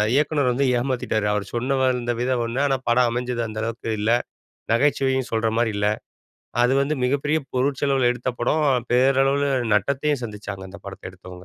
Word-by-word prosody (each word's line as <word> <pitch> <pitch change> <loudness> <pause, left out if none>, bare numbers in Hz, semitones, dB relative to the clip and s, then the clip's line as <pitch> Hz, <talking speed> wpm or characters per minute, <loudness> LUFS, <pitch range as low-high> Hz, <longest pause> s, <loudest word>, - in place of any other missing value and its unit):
இயக்குனர் 145 -3 +2
வந்து 135 +3 +1
ஏமாத்திட்டாரு. 120 -4 -1
அவர் 105 -1 -1
சொன்ன 130 +4 0
வந்த 125 -2 +1
விதம் 125 -1 0
ஒண்ணு, 120 +3 -3
ஆனா 135 -1 +1
படம் 120 0 +4
அமைஞ்சது 125 0 -2
அந்த 110 0 -6
அளவுக்கு 115 0 -4
இல்ல. 110 +2 +1 0.6
நகைச்சுவையும் 130 0 +2
சொல்ற 115 0 +1
மாரி 115 -2 +1
இல்ல. 105 0 0 0.8
அது 125 - +3
வந்து 145 +2 0
மிகப்பெரிய 145 +4 +1 0.2
பொருட்செலவுல 135 -1 +1
எடுத்த 125 +1 -5
படம். 150 +5 +2 0.3
பேரளவுல 135 +2 +3 0.3
நட்டத்தையும் 140 +6 0
சந்திச்சாங்க 105 -3 -7
அந்த 100 - -10
படத்தை 95 -1 -8
எடுத்தவுங்க. 90 -1 -12
125 Hz, 155 wpm, -23 LUFS, 115-135 Hz, 0.8 s, படம்